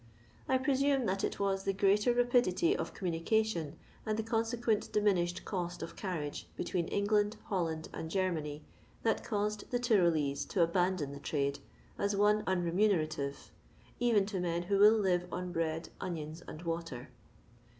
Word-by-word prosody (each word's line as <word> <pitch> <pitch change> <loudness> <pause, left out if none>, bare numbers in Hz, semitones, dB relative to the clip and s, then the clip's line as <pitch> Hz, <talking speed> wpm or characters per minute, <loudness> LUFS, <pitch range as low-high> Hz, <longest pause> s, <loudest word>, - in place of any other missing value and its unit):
I 260 - +4
presume 270 0 +2
that 195 -1 -1
it - - -2
was 195 -1 0
the 195 - 0
greater 200 +4 +3
rapidity 245 - +3
of - - -3
communication, 175 -2 0 0.3
and 215 0 -1
the 220 - -1
conse 225 +1 -1
quent 225 -3 0
diminished 185 -4 +1
cost 175 -3 -3
of - - -7
carriage, 165 -7 -4
between 175 -3 -1
Eng 200 - 0
land, 210 0 +2
Holland, 165 -5 -1
and 160 - -5
Germany, 160 -5 -1 0.4
that 225 - +1
caused 210 -1 -2
the 245 - +1
Tyrolesc 170 - +2
to 180 - +2
abandon 175 -3 +1
the 140 - -8
trade 140 -1 -1 0.4
as 200 0 +1
one 210 +1 +4
unremune 185 +2 +2
rative 145 -3 -4 0.2
— - - -28
even 230 -5 +3
to 200 -2 -3
men 175 -1 -1
who 195 +2 +1
will 210 +2 +8
live 180 -3 +1
on 180 0 -4
bread, 165 -1 -2
onions, 160 -2 -5
and 155 - -8
water. 165 -7 -4
190 Hz, 160 wpm, -33 LUFS, 165-215 Hz, 0.4 s, will